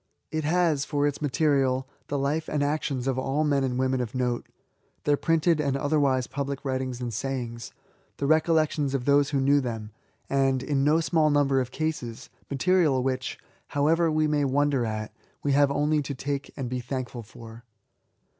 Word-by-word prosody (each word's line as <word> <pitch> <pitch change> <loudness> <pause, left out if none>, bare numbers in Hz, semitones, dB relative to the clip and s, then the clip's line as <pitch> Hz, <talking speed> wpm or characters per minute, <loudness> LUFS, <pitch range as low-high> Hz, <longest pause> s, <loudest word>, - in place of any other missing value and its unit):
It 155 0 -1
has, 160 -3 +2
for 145 -1 0
its 145 -1 -1
material^ 135 -3 +1 0.2
the 145 - -2
life 145 +4 -1
and 145 -1 0
actions 145 -3 -1
of 130 -1 0
all 135 +3 0
men 140 -2 +2
and 125 -2 -1
women 130 0 +1
of 120 0 -5
note; 125 -1 -1 0.3
— - - -43
their 145 - +3
printed 165 +1 +2
and 140 -2 0
otherwise 140 -3 +1
public 140 +1 -4
writings 130 -2 -2
and 120 -2 -3
sayings; 120 -1 -4 0.2
— - - -39
the 140 - -2
recollections 155 -2 +2
of 125 -2 -2
those 145 0 +4
who 140 - 0
knew 140 +2 +4
them; 115 -4 -5 0.4
and^ 135 -1 +1
in 135 0 0
no 155 +3 +4
small 160 -2 +2
number 140 -2 +3
of 125 - -4
cases^ 130 -6 -4 0.2
material 145 -2 +2
which^ 130 -1 -2 0.3
however 160 +4 +2
we 155 0 +2
may 150 -1 +1
wonder 140 -2 +1
at; 110 -1 -4 0.3
we 145 - +1
have 140 0 +4
only 150 +2 +1
to 140 0 -5
take 140 +1 -4
and 135 -3 -3
be 125 +1 -3
thankful 125 -1 -5
for. 115 +1 -12
140 Hz, 185 wpm, -26 LUFS, 130-150 Hz, 0.4 s, those